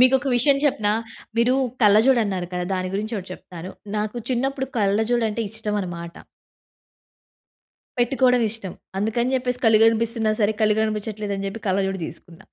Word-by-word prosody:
మీకు 255 +1 +6
ఒక 270 - -8
విషయం 275 +3 +4
చెప్పనా? 220 -8 +2 0.4
మీరు 240 +2 +3 0.3
కళ్ళజోడు 220 +5 +5
అన్నారు 185 -3 -2
కదా! 180 0 -2
దాని 185 0 -2
గురించి 215 +3 -2
ఒకటి 185 0 -9
చెప్తాను. 180 0 -10 0.3
నాకు 210 +2 -2
చిన్నప్పుడు 265 +2 -1
కళ్ళజోడు 220 +3 +2
అంటే 230 +2 -2
ఇష్టం 220 -1 -2
అనమాట. 170 -2 -6 1.9
పెట్టుకోవడం 250 0 +3
ఇష్టం. 200 -4 -6 0.3
అందుకని 235 +5 0
చెప్పేసి 250 -1 -2
కళ్ళు 220 -1 +6
కనిపిస్తన్నా 225 -1 +1
సరే 215 +1 +2
కళ్ళు 210 -1 +4
కనిపిచ్చట్లేదని 210 -2 -3
జెప్పి 210 +3 -6
కళ్ళజోడు 195 0 0
తీసుకున్నా. 165 -2 -11
215 Hz, 145 wpm, -23 LUFS, 195-240 Hz, 1.9 s, మీకు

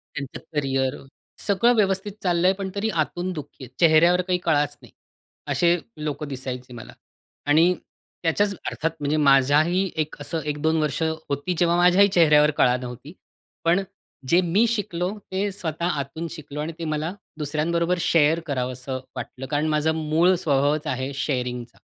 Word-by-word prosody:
त्यांचं 140 -2 -5 0.2
करियर, 135 -2 0 0.5
सगळं 225 +4 +4
व्यवस्थित 195 -1 +1
चाललं 175 -1 +2
आहे, 190 - +5
पण 195 -1 -4
तरी 210 +2 -1
आतून 180 +4 -5
दुःखी 145 -3 -9
आहेत. 125 - -9
चेहऱ्यावर 170 +2 +5
काही 180 0 0
कळाच 145 -4 +1
नाही. - - -16 0.6
असे 170 0 +3 0.2
लोकं 150 -1 -4
दिसायचे 130 -2 -6
मला 120 - -10 0.5
आणि 165 +5 +5 0.5
त्याच्याच 200 +5 +2
अर्थात 165 +1 -1
म्हणजे 145 +1 0
माझ्याही 150 +6 +4
एक 155 - -12
असं 165 +3 -3
1-2 150 +2 0
वर्ष 150 +1 -1
होती, 160 +1 -2
जेव्हा 170 0 +3
माझ्याही 180 +3 +6
चेहऱ्यावर 150 -5 +5
कळा 125 0 +4
नव्हती. 125 +4 -8 0.5
पण 175 +4 +3 0.5
जे 175 - +5
मी 185 +6 +3
शिकलो 185 -6 -1 0.2
ते 200 +2 -1
स्वतः 170 -3 -4
आतून 160 +5 -5
शिकलो 150 -3 -8
आणि 155 +2 -3
ते 165 - -4
मला 155 +2 -2 0.2
दुसऱ्यांबरोबर 165 +4 0
शेअर 160 0 +3
करावंस 130 -3 -3
वाटलं. 130 0 -6
कारण 145 +3 -1
माझा 155 +1 +2
मूळ 160 +3 +2
स्वभावच 145 +1 +1
आहे 130 +1 -2
शेअरिंगचा, 125 -3 -3
155 Hz, 150 wpm, -24 LUFS, 140-175 Hz, 0.6 s, माझ्याही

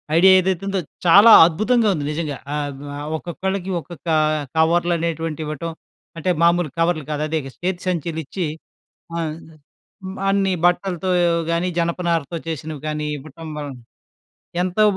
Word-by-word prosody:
Idea 190 +3 +7
ఏదైతే 185 0 -1
ఉందో 195 -1 0 0.3
చాలా 200 +7 +8 0.2
అద్భుతంగా 215 +7 +1
ఉంది 145 -4 -3
నిజంగా. 150 -3 -3 0.2
ఆహ్, 145 -1 -2 0.2
ఆహ్ 145 +1 -6
ఒక్కొక్కళ్ళకి 190 +3 -4
ఒక్కొక్క 170 +1 -12 0.5
కవర్లనేటువంటివి 165 -1 +1
ఇవ్వటం, 155 +2 -4 0.5
అంటే 165 +3 -2
మామూలు 170 -1 +3
కవర్లు 165 -2 +1
కాదు 150 0 -1
అదే 160 0 -1 0.2
చేతి 185 -1 -1
సంచిలిచ్చి, 165 0 -2 0.7
ఆహ్, 160 -2 -2 0.9
అన్ని 195 -1 +2
బట్టలతో 180 0 +1 0.4
గానీ, 170 +2 0
జనపనారతో 170 -2 -1
చేసినవి 155 -2 -5
కానీ 150 0 -3
ఇవ్వటం 155 +3 -11
వలన 145 -3 -6 0.9
ఎంతో 185 +4 +1
170 Hz, 120 wpm, -21 LUFS, 155-180 Hz, 0.9 s, చాలా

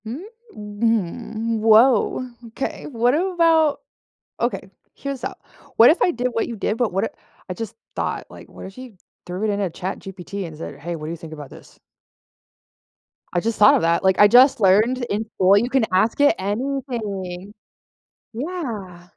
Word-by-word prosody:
Mm, 240 +8 -6 0.3
mm, 220 +1 -2
woah, 225 +3 +4 0.3
'kay, - - -4
what 245 -2 +1
about 330 -3 +2 0.6
okay, - - -2 0.2
here's 275 -2 -6
up, - - -6 0.3
what 230 - +8
if 325 - +2
I - - +4
did 250 -4 -1
what 230 -2 -2
you 235 - -5
did, 210 - -1
but 240 -3 +1
what 195 +3 0
I - - -1 0.4
I - - -2
just 225 +3 -7 0.2
thought, - - -3
like, - - -13
what - - -11
if 190 - -12
you 255 -5 -11 0.3
threw 180 +4 -4
it 215 - +1
in 200 0 -1
a 195 -3 -1
ChatGPT 190 +2 -6
and 155 - -11
said, 160 - -8
"Hey, 170 +3 -4
what 155 -1 -7
do - - -5
you - - -5
think 165 -1 -11
about 145 -3 -9
this?" - - -15 1.6
I 175 - +2
just 225 +4 -2
thought 210 - +7
of - - +1
that, 170 +1 +1
like, 190 0 +2
I 205 - +9
just 250 +5 +6
learned 220 +6 +3
in 210 +2 -1
school, 190 +2 +5
you 235 +4 +1
can 260 -3 +2
ask 215 +8 +2
it 285 - +5
anything. 205 -4 -4 0.8
Yeah, 225 - -6
220 Hz, 180 wpm, -21 LUFS, 190-250 Hz, 1.6 s, I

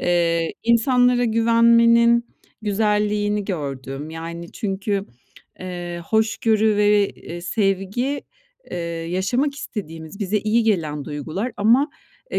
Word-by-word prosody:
Eee, 170 -1 +1
insanlara 245 +1 +3
güvenmenin 235 +1 +4 0.4
güzelliğini 210 0 0
gördüm. 140 -4 -5
Yani, 170 +1 -7
çünkü, 200 0 -2 0.5
eee, 175 -1 -5
hoşgörü 220 -1 +2
ve, 205 -1 +4
eee, 175 +1 -9
sevgi, 195 +8 -1 0.5
eee, 180 - -4 0.3
yaşamak 245 +10 0
istediğimiz, 165 - -7
bize 205 +1 0
iyi 215 +3 +1
gelen 160 -10 0
duygular 160 - -4
ama, 235 +8 +4 0.4
e, - - 0
205 Hz, 100 wpm, -22 LUFS, 175-230 Hz, 0.5 s, güvenmenin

